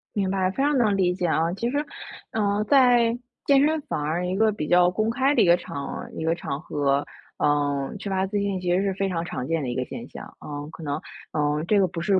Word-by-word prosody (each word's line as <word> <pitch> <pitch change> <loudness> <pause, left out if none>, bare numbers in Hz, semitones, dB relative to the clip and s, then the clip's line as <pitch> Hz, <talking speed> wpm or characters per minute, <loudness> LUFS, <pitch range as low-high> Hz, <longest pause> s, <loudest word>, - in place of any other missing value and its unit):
明 195 -2 0
白， 190 -1 +1
非 - - -17
常 290 -1 +2
能 210 -5 +3
理 180 -2 +2
解 180 -1 -2
啊。 165 +1 +1
其 235 +5 -2
实， 285 - -1 0.5
呃， 210 -1 0
在 245 -3 +5 0.3
健 280 0 +5
身 315 0 +1
房 150 - -3
儿 165 +4 -1
一 185 - -1
个 220 +1 +3
比 150 -7 -4
较 175 0 +5
公 215 +4 0
开 270 +4 +2
的 - - +4
一 - - +5
个 170 0 +6
场 140 -5 -6
一 160 - -4
个 165 +1 +2
场 140 -4 -4
合， 145 -2 0 0.4
嗯， 145 -2 +1
缺 200 - -6
乏 190 0 +1
自 205 +1 -2
信 200 -2 -1
其 180 -1 +1
实 190 - +2
是 195 -1 0
非 195 0 0
常 170 -3 -2
常 130 -6 -5
见 165 -2 0
的 125 - -2
一 120 - -3
个 130 -1 -1
现 - - -8
象。 - - -9 0.2
嗯， 145 0 -6
可 165 - -10
能， 145 +1 -2 0.3
嗯， 150 0 0
这 205 +1 +3
个 190 - +4
不 165 0 -5
是 190 +1 +3
180 Hz, 270 characters per minute, -25 LUFS, 150-210 Hz, 0.5 s, 个